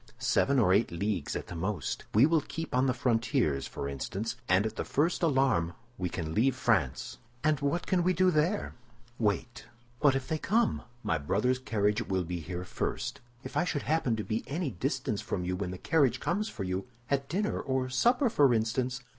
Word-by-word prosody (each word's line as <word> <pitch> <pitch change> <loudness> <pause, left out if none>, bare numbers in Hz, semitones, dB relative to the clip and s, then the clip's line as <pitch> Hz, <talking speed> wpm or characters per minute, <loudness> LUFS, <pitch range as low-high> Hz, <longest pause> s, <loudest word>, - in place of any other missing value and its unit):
"Seven 140 0 +2
or 105 -7 +4
eight 110 - +3
leagues 90 -3 -2
at - - -3
the - - -8
most. 95 +4 -3
We 115 +5 +7
will 160 0 +3
keep 165 +3 -6
on 130 +1 +3
the 130 - +2
frontiers, 115 - +1
for 70 - -5
instance; 95 - -3
and 95 +3 +4
at 110 - -3
the - - -2
first 160 +5 +1
alarm 135 - +2 0.3
we 90 -1 -1
can 80 -2 -4
leave 125 +7 +3
France." 80 - 0 0.2
"And 155 -2 +3
what 145 +5 0
can 185 -2 +2
we 180 +2 +3
do 185 0 +3
there?" 170 +6 +1 0.5
"Wait." 115 +2 -1 0.3
"But 145 -3 +4
if 135 -1 -2
they 160 - -1
come?" 225 +6 +1 0.2
"My 80 - 0
brother's 105 - +1
carriage 105 -4 +1
will 95 -1 -1
be 90 +1 -4
here 90 +2 -5
first." - - -3 0.2
"If - - -8
I - - +3
should 160 -5 -2
happen 150 -7 +1
to 110 - -3
be 110 +1 -2
any 155 0 -2
distance 90 - -2
from 90 - -3
you 90 +1 -1
when 95 -1 -3
the 90 - -5
carriage 135 - +2
comes 210 +5 -1
for 100 - -5
you—at 120 +8 -3
dinner 205 +5 0
or 130 -1 -1
supper, 240 - +3
for 140 - +4
instance?" 125 +3 -1
125 Hz, 195 wpm, -30 LUFS, 95-145 Hz, 0.5 s, We